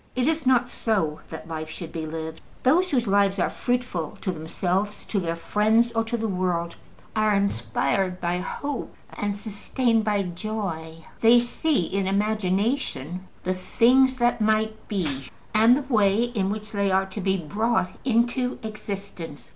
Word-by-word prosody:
It 250 -1 +1
is 315 -2 0
not 250 -1 +4
so 190 -11 -1
that 160 - -8
life 155 -1 -5
should 165 +1 -7
be 160 -1 -4
lived. 160 0 -6 0.2
Those 345 +8 +4
whose 250 -6 +1
lives 200 -1 +3
are - - +1
fruitful 245 - -2
to 190 - -1
themselves, 180 +5 -2
to 205 - -1
their 165 -2 -2
friends, 220 +7 +2
or 225 -1 +1
to 235 +1 -2
the 225 0 -1
world 180 -3 -1 0.4
are 215 -1 +3
inspired 185 - 0
by 175 +1 -1
hope 280 +8 -4 0.2
and 205 -1 -2
sustained 225 +2 0
by 205 -2 +1
joy: 175 -4 -5
they 230 +2 +7
see 260 +4 +1
in 195 +2 -1
imagination 195 - 0 0.2
the 185 - 0
things 250 +8 +4
that 240 -2 +1
might 220 0 +1
be 150 -10 -2 0.3
and 225 +4 +6
the 290 - -3
way 205 +1 +4
in 220 -6 -1
which 215 +1 -4
they 200 -2 +1
are 190 +1 +3
to 195 +2 -6
be 190 0 +1
brought 205 +3 0
into 250 +1 +1
existence. 200 -7 -7
205 Hz, 160 wpm, -25 LUFS, 180-230 Hz, 0.4 s, they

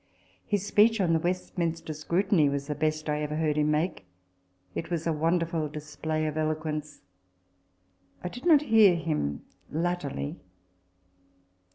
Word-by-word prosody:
His 205 -2 0
speech 220 +2 +4
on 175 -4 +2
the 165 - +3
Westminster 170 -2 -2
Scrutiny 170 +2 +2
f - - +1
was 140 0 -2
the 150 - -2
best 155 +1 -1
I 150 0 0
ever 150 0 -2
heard 155 -1 +1
him 150 0 +2
make. 150 - -1 0.7
It 165 - -4
was 170 -2 -2
a 165 - +1
wonderful 165 0 0
display 155 +1 -3
of 155 0 -2
eloquence. 155 -1 -2 1.2
I - - -2
did 245 - -6
not 305 -4 +6
hear 220 -8 +6
him 150 - -2 0.2
latterly. 155 - -2
160 Hz, 145 wpm, -28 LUFS, 150-175 Hz, 1.2 s, not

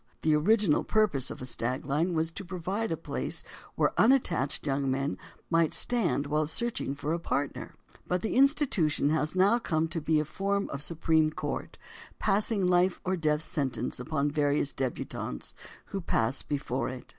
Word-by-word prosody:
The 155 - +4
original 185 +2 +3
purpose 205 - +2
of - - -7
a - - -4
"stag 125 +1 -3
line" 160 +6 0
was 160 +1 0
to 200 - -6
provide 190 +4 -3
a 165 - 0
place - - -3 0.3
where - - +2
unattached 175 - +2
young 135 -1 0
men 135 +2 -1 0.4
might 165 -2 +3
stand 220 -12 +1
while 150 +1 0
searching 225 - -1
for 145 +2 -2
a 170 - -1
partner, 145 -4 -3 0.3
but 180 0 -1
the 220 - -1
institution 255 - +3
has 155 +1 0
now 200 +6 +4
come 160 -7 0
to 165 - -3
be 155 0 +2
a 150 - 0
form 200 +5 -1
of 140 - -4
Supreme 160 0 +2
Court, 155 - -5 0.4
passing 205 -1 +1
life 180 0 +3
or 190 0 +1
death 155 -2 0
sentence 130 -7 -2
upon 145 +2 -1
the - - -8
various 145 -1 +1
debutantes 130 - -4 0.3
who 195 - -4
pass 130 -6 +1
before 135 -3 -2
it. 130 -1 -8
160 Hz, 170 wpm, -29 LUFS, 145-190 Hz, 0.4 s, The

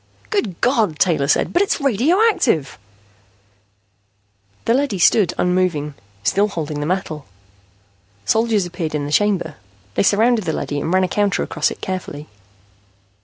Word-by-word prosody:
"Good 215 - -1
God!" 220 - +2
Taylor 155 -6 +2
said. - - +1
"But 350 - +3
it's 405 - 0
radioactive!" 275 - +2 1.9
The 230 - +3
leady 265 -5 0
stood 185 +2 +4
unmoving, 180 -5 0 0.3
still 200 - +2
holding 155 -6 -4
the 145 - -2
metal. 165 -5 -3 1.0
Soldiers 220 -3 +2
appeared 170 -3 -4
in 145 -1 -2
the 145 - -5
chamber. 180 -4 +1 0.4
They - - +1
surrounded 215 +2 +3
the 160 - -1
leady 145 -1 -3
and 160 - -2
ran 185 0 +3
a - - +2
counter 205 +1 0
across - - 0
it - - -9
carefully. 165 -5 -5
185 Hz, 140 wpm, -19 LUFS, 155-225 Hz, 1.9 s, stood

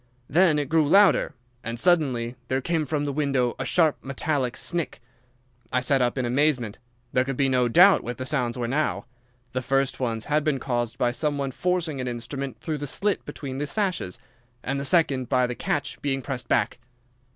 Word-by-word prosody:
Then 165 0 +4
it 145 -2 -1
grew 155 0 +2
louder, 200 +4 +4 0.3
and 115 0 -4
suddenly 130 -9 +2
there 130 - 0
came 160 +2 -1
from 145 0 -1
the 140 - -2
window 135 -4 0
a - - -2
sharp 160 -4 +3
metallic 135 -2 -2
snick. 170 -2 -2 0.7
I 125 - +2
sat 130 +1 +2
up 125 +1 +1
in 130 - 0
amazement. 125 -4 +1 0.3
There 125 - +3
could 135 -1 -4
be 140 - +3
no 125 -1 +2
doubt 180 +11 +6
what 120 0 -5
the 130 - -5
sounds 125 -4 -1
were 120 -1 -2
now. 145 +2 -1 0.5
The 130 - -1
first 135 +1 0
ones 115 -3 -2
had 150 0 +1
been 150 -3 +1
caused 120 -2 -2
by 120 - +1
some 145 +3 -1
one 140 -1 -2
forcing 170 -3 -1
an 125 - -3
instrument 125 +3 -5
through 155 -2 -3
the 145 - -4
slit 205 +8 -1
between 140 -2 -6
the 145 - -2
sashes, 185 - -2 0.5
and 135 +1 -2
the 140 - -3
second 140 -6 +2
by 125 -2 +3
the 125 - -3
catch 145 +3 -3
being 135 -2 -1
pressed 125 -3 -4
back. - - +1
135 Hz, 195 wpm, -25 LUFS, 125-150 Hz, 0.7 s, doubt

